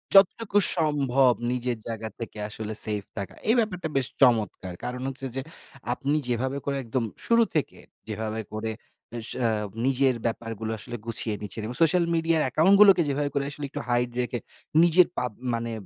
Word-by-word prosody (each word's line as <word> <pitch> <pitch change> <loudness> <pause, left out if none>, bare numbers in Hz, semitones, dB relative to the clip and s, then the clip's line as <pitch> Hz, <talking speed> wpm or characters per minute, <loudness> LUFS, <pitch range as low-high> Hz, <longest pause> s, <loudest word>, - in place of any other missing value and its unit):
যতটুকু 200 +2 +5 0.2
সম্ভব 135 -5 +3 0.2
নিজের 125 -1 -1
জায়গা 110 -1 -4
থেকে 115 -2 -7
আসলে 110 0 -5
সেফ 105 -2 -2
থাকা, 100 -1 -4 0.2
এই 230 - +6
ব্যাপারটা 180 -7 -1
বেশ 130 - +1
চমৎকার। 110 -7 +3
কারণ 125 +1 -4
হচ্ছে 135 0 -5
যে, 135 - -1 0.5
আপনি 140 +4 -1
যেভাবে 130 +3 -1
করে, 140 - -1
একদম 115 +1 -1 0.2
শুরু 230 0 +5
থেকে 150 - 0 0.3
যেভাবে 110 +1 -3
করে 110 +1 -2 0.4
এ 120 - -3
স - - -7 0.4
উম 100 - -15
নিজের 135 -1 +3
ব্যাপারগুলো 115 -1 -3
আসলে 120 - -7
গুছিয়ে 115 -2 0
নিচ্ছেন। 105 +1 -6
এবং 120 - -3
সোশ্যাল 170 +1 +4
মিডিয়া 165 0 +2
অ্যাকাউন্টগুলোকে 195 +7 +6
যেভাবে 145 +1 0
করে 140 - +1
আসলে 145 0 -5
একটু - - -5
hide 120 0 +1
রেখে 120 0 -3 0.4
নিজের 175 +1 +6
পাব 125 -2 -1 0.2
মানে 115 0 -2
125 Hz, 165 wpm, -26 LUFS, 115-150 Hz, 0.5 s, এই